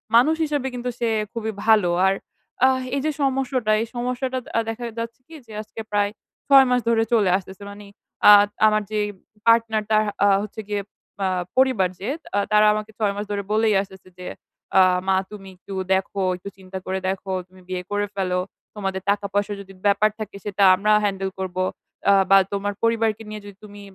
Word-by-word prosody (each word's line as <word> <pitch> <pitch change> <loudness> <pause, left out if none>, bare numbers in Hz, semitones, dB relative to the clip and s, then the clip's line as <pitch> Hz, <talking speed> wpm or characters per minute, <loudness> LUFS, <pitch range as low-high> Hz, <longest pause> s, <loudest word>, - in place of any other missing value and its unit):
মানুষ 285 +7 +5
হিসাবে 290 -3 -2
কিন্তু 250 0 -3
সে 235 -1 +1 0.2
খুবই 220 -2 -3
ভালো 215 -5 +4 0.2
আর, 190 - +3 0.5
আহ 260 0 +2
এই 275 - 0
যে 310 - +2
সমস্যাটা 265 -4 0
এই 230 - -3
সমস্যাটা 250 +2 -2
দ - - -17
আ - - +4
দেখা 225 +2 -5 0.2
যাচ্ছে 230 +1 -5
কি 325 - -12
যে 225 - -15
আজকে 215 +1 -12
প্রায় 205 -1 +2 0.4
৬ 275 -1 +8
মাস 250 0 +3
ধরে 225 -1 +3
চলে 210 -5 +4
আসতেছে 190 +1 -11
মানে 205 0 -11 0.4
আ - - +12 0.4
আমার 215 0 +2
যে 215 - 0 0.2
ব - - -25 0.3
পার্টনার 225 -2 +4
তার 215 0 +3 0.2
আ - - +6 0.2
হচ্ছে 215 +1 -7
গিয়ে, 205 -1 -2 0.4
আ - - +2 0.3
পরিবার 255 -8 +3
যে 200 - -5 0.3
আ - - +4
তারা 215 0 +5
আমাকে 215 +1 -4
৬ 205 -2 +1
মাস 205 - -4
ধরে 200 -1 -2
বলেই 220 0 +3
আসতেছে 190 -2 -12
যে, 180 - -8 0.5
"আ - - +8 0.3
মা 190 - +3 0.2
তুমি 195 -2 -10
একটু 195 +2 -10 0.2
দেখো, 195 +1 -1
একটু 185 +3 -8
চিন্তা 190 0 -8
করে 190 0 -2
দেখো, 190 0 -4 0.2
তুমি 185 0 -19
বিয়ে 180 -1 -3
করে 205 0 0
ফেলো। 185 -2 0 0.4
তোমাদের 195 -2 -3
টাকা-পয়সার 205 0 0
যদি 195 0 -13
ব্যাপার 205 +1 +4
থাকে 215 -2 -6
সেটা 200 -1 0
আমরা 210 +3 +1
handle 195 -1 -2
করব। 185 -1 -5 0.5
আ - - +7 0.2
বা 195 - +9 0.2
তোমার 200 +1 -2
পরিবারকে 225 -1 +1
নিয়ে 215 0 -7
যদি 205 -1 -11
তুমি 205 -1 -11
210 Hz, 195 wpm, -23 LUFS, 195-230 Hz, 0.5 s, আ